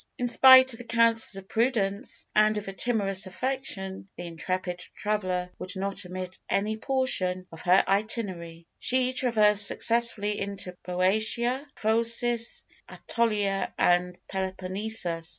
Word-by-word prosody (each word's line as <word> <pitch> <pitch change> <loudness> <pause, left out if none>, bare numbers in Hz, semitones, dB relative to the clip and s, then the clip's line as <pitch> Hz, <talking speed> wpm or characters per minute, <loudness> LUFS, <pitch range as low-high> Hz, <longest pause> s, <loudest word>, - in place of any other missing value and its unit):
In 245 - -2
spite 260 +1 +7
of 230 - -9
the - - -8
counsels 230 -2 +2
of 195 0 -9
prudence 220 -2 -2
and 215 0 +2
of 210 - -6
a 195 - -6
timorous 195 -3 +1
affection, 190 -4 -5
the 175 - -7
intrepid 180 +2 -5 0.2
traveller 185 -4 -3
would 185 - -7
not 195 +1 -4
omit 185 0 -8
any 210 +2 -1
portion 215 -7 -1
of 165 - -11
her 185 +2 +3
itinerary; 190 -5 -3
she 255 0 0
traversed 210 -5 +5
successively 225 -3 +2
into 195 -2 -5
Boeotia, 220 - -1
Phocis, 230 +1 +3 0.3
Ætolia, 205 -4 -2
and 180 0 +1
the - - -34
Peloponnesus. 190 -2 -3
205 Hz, 130 wpm, -26 LUFS, 185-230 Hz, 0.3 s, spite